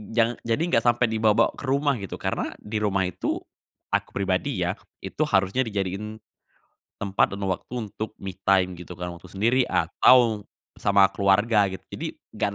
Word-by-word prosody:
jangan 115 Hz, 0 st, +2 dB
jadi 115 Hz, +6 st, +1 dB
nggak 115 Hz, -, +3 dB
sampai 120 Hz, 0 st, +4 dB
dibawa-bawa 110 Hz, -1 st, +3 dB
ke -, -, -10 dB
rumah 140 Hz, +1 st, +2 dB
gitu, 100 Hz, -, -6 dB
karena -, -, -3 dB
di 105 Hz, +1 st, -3 dB
rumah 100 Hz, -2 st, +1 dB
itu, 90 Hz, -, -2 dB, 0.5 s
aku -, -, 0 dB
pribadi -, -, 0 dB
ya, -, -, +1 dB, 0.3 s
itu -, -, -1 dB
harusnya 95 Hz, +4 st, +1 dB
dijadiin, 100 Hz, +1 st, -3 dB, 0.9 s
tempat 100 Hz, -1 st, +1 dB
dan -, -, -8 dB
waktu 95 Hz, +4 st, -3 dB, 0.2 s
untuk 110 Hz, +2 st, -6 dB
me 95 Hz, -1 st, -5 dB, 0.2 s
time 95 Hz, -1 st, +4 dB
gitu 90 Hz, 0 st, -9 dB
kan, 90 Hz, 0 st, -5 dB
waktu 85 Hz, -, -14 dB
sendiri 115 Hz, +6 st, +2 dB
atau 115 Hz, -5 st, +4 dB, 0.4 s
sama 100 Hz, -1 st, +5 dB
keluarga 100 Hz, +2 st, +3 dB
gitu. 95 Hz, -1 st, -8 dB
Jadi -, -, -4 dB, 0.3 s
nggak 105 Hz, -, 0 dB
105 Hz, 165 wpm, -25 LUFS, 95-115 Hz, 0.9 s, sama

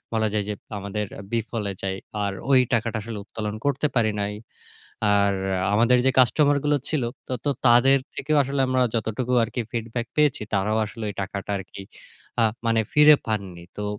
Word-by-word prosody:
বলা 110 Hz, -1 st, +2 dB
যায় 105 Hz, -, 0 dB
যে, -, -, -1 dB, 0.3 s
আমাদের 100 Hz, +1 st, -3 dB, 0.3 s
বিফলে 115 Hz, -3 st, -2 dB
যায়। 95 Hz, 0 st, -2 dB, 0.3 s
আর 100 Hz, -, -1 dB, 0.2 s
ওই 130 Hz, -, +7 dB
টাকাটা 115 Hz, 0 st, 0 dB
আসলে 110 Hz, 0 st, -6 dB
উত্তোলন 105 Hz, 0 st, -5 dB
করতে 145 Hz, +1 st, +1 dB
পারি 110 Hz, -3 st, +3 dB
নাই। 100 Hz, +1 st, -2 dB, 0.8 s
আর 100 Hz, 0 st, +3 dB, 0.4 s
আমাদের 120 Hz, +3 st, +4 dB
যে, -, -, +5 dB
কাস্টমার 145 Hz, +3 st, +4 dB
গুলো 150 Hz, 0 st, +3 dB
ছিল 155 Hz, -4 st, 0 dB, 0.4 s
তো -, -, +3 dB, 0.2 s
তাদের 130 Hz, +3 st, +6 dB, 0.2 s
থেকেও 150 Hz, +2 st, 0 dB
আসলে 140 Hz, +1 st, -2 dB
আমরা 130 Hz, 0 st, +2 dB
যতটুকু 115 Hz, +2 st, -1 dB
আরকি 120 Hz, +2 st, -4 dB
feedback 115 Hz, 0 st, -3 dB
পেয়েছি 150 Hz, -7 st, +2 dB
তারাও 105 Hz, +3 st, +1 dB
আসলে 110 Hz, +1 st, -7 dB
ওই -, -, -8 dB
টাকাটা 100 Hz, +1 st, -5 dB
আরকি 95 Hz, +1 st, -9 dB, 0.6 s
আ -, -, +5 dB, 0.2 s
মানে 115 Hz, -1 st, +3 dB
ফিরে 150 Hz, 0 st, +7 dB
পাননি। 95 Hz, -6 st, -4 dB
তো 105 Hz, -, -4 dB
115 Hz, 165 wpm, -24 LUFS, 105-130 Hz, 0.8 s, ওই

